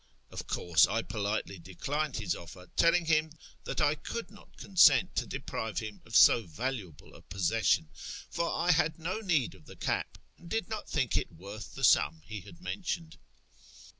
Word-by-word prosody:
Of - - -6
course 85 -1 +4
I 115 +4 -1
politely 100 -2 -3
declined 140 - -3
his 105 -7 -1
offer, 90 +1 -11
telling 170 0 +4
him 155 -1 +2 0.3
that - - -3
I 145 - +4
could 205 +8 -6
not 205 - -17
consent 185 -4 +5
to - - 0
deprive 110 -5 -4
him 105 +1 -4
of 115 - -6
so 120 - +8
valuable 95 - -5
a - - -14
possession; 90 -2 +1 0.4
for 170 0 -1
I 175 +1 +2
had 160 -1 +2
no 175 +6 -3
need 170 - +1
of 90 -5 -18
the - - -11
cap, - - -2 0.2
and 170 - -13
did 225 +2 -2
not 215 -1 -5
think 130 -7 +1
it - - -2
worth 100 +5 -9
the - - -7
sum 80 +2 +4
he 105 -2 -6
had 170 - -14
mentioned. 170 -3 -4
120 Hz, 175 wpm, -31 LUFS, -, 0.4 s, so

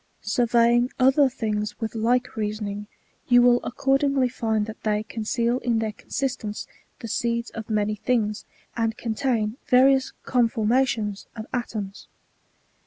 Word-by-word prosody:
Surveying 240 +2 +3
other 270 +2 +5
things 210 -4 -3
with 225 -2 -3
like 245 +3 0
reasoning, 210 -1 -3 0.4
you 245 -1 +6
will 245 0 +5
ac - - -5
cordingly 275 -1 +2
find 220 -3 -1
that 220 0 -9
they 210 -1 0
conceal 230 +2 -1
in 240 -3 0
their 220 -1 -1
consistence 245 -2 -4 0.4
the 230 - -5
seeds 235 +1 -1
of 225 -1 -7
many 215 -1 +1
things, 215 -1 -1 0.3
and 225 -1 -1
contain 230 -1 -1
various 265 +1 +4
conformations 230 -2 +1
of 220 -1 -6
atoms. 215 -5 -4
230 Hz, 130 wpm, -24 LUFS, 215-250 Hz, 0.4 s, you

